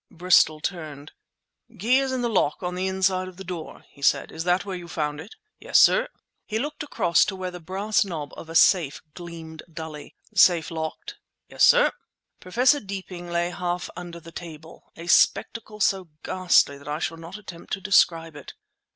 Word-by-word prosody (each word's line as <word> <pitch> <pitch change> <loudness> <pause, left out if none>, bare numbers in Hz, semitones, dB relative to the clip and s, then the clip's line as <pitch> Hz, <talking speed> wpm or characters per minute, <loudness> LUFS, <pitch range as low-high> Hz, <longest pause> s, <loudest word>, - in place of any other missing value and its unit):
Bristol 170 -3 +3
turned. 155 -5 -5 0.7
"Key 245 +7 +3
is 270 -1 -1
in 260 -1 -1
the - - +2
lock 185 -8 0
on 180 0 -2
the 185 +1 -2
inside 190 -1 0
of 185 -1 -11
the 190 - -8
door," 175 -3 -8
he 140 - -19
said. - - +2
"Is 165 +1 -5
that 180 +2 +2
where 195 -2 -4
you 175 -1 -8
found 150 -3 -3
it?" 180 - -12 0.2
"Yes, - - +1
sir!" - - +5 0.4
He 215 - -2
looked 295 +6 -4
across 205 - +2
to 195 - -4
where 185 -1 -5
the 180 - -8
brass 195 +6 0
knob 160 -7 -6
of 160 - -10
a 165 - -8
safe 165 -4 +4
gleamed 165 -2 -9
dully. 160 -2 -8 0.2
"Safe 170 -3 +4
locked?" 160 -1 -6 0.3
"Yes, - - 0
sir." - - +6 0.5
Professor 250 +10 +3
Deeping 190 -4 -7
lay 170 0 0
half 175 0 -3
under 175 -1 -8
the 165 0 -13
table, 165 -2 -11
a 170 - -8
spectacle 210 +4 +2
so 190 -3 +1
ghastly 175 -6 +2
that 140 - -15
I 150 +1 -2
shall 165 0 -3
not 165 +4 -9
attempt 175 -5 -12
to 195 - -1
describe 165 -5 +3
it. 145 - -10
175 Hz, 185 wpm, -25 LUFS, 165-190 Hz, 0.7 s, sir